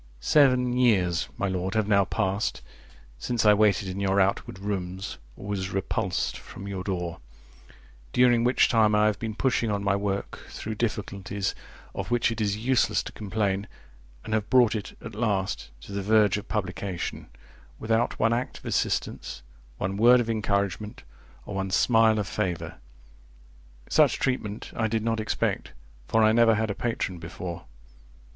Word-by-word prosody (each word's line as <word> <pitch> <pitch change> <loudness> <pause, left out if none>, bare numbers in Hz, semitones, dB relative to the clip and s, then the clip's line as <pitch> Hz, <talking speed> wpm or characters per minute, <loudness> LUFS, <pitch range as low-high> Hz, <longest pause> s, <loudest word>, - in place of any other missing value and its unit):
Seven 125 - +4
years, 95 -9 +2
my 100 - 0
lord, 95 +1 -2
have 110 -2 +1
now 100 -2 +4
passed, 100 0 -1 0.6
since 115 - -1
I 105 - +8
waited 105 -2 +3
in 95 +1 -4
your 100 0 +2
outward 95 -1 0
rooms, 95 -5 -4 0.2
or - - -10
was 95 -2 -2
repulsed 95 -1 -2
from 100 - -10
your 95 -2 -4
door; 90 -3 -3 0.9
during 120 -2 +4
which 125 +2 +4
time 110 -3 +3
I 105 0 +4
have 105 -1 +1
been 110 -2 -4
pushing 120 -2 +1
on 100 -1 -1
my 100 0 +2
work 100 0 -3
through 110 - -5
difficulties, 100 -3 -3 0.4
of - - -5
which 120 -1 +2
it 115 0 -3
is 100 -1 0
useless 125 +3 +2
to - - -7
complain, 100 -1 -2 0.6
and 110 - -4
have 105 -2 0
brought 125 -4 +5
it, 105 -3 -5
at 110 - -7
last, 100 - -1
to 65 - -11
the 100 0 -2
verge 105 -1 +4
of 105 +2 -5
publication, 95 -3 -4 0.5
without 115 +2 0
one 115 +1 +2
act 120 +2 -2
of - - -16
assistance, 60 0 -2 0.3
one 95 +6 -2
word 120 +3 +7
of 115 -1 0
encouragement, 100 -1 -2 0.4
or - - -7
one 95 0 -2
smile 110 +2 +4
of 105 - 0
favour. 90 -7 -3 1.1
Such - - +4
treatment 110 -5 -2
I 110 - +1
did 110 0 -1
not 115 0 0
expect, 110 - -2 0.3
for 110 0 +3
I 110 - +6
never 115 0 +5
had 110 0 0
a - - -1
patron 100 -6 -3
before. 85 +1 -7
105 Hz, 165 wpm, -26 LUFS, 95-115 Hz, 1.1 s, I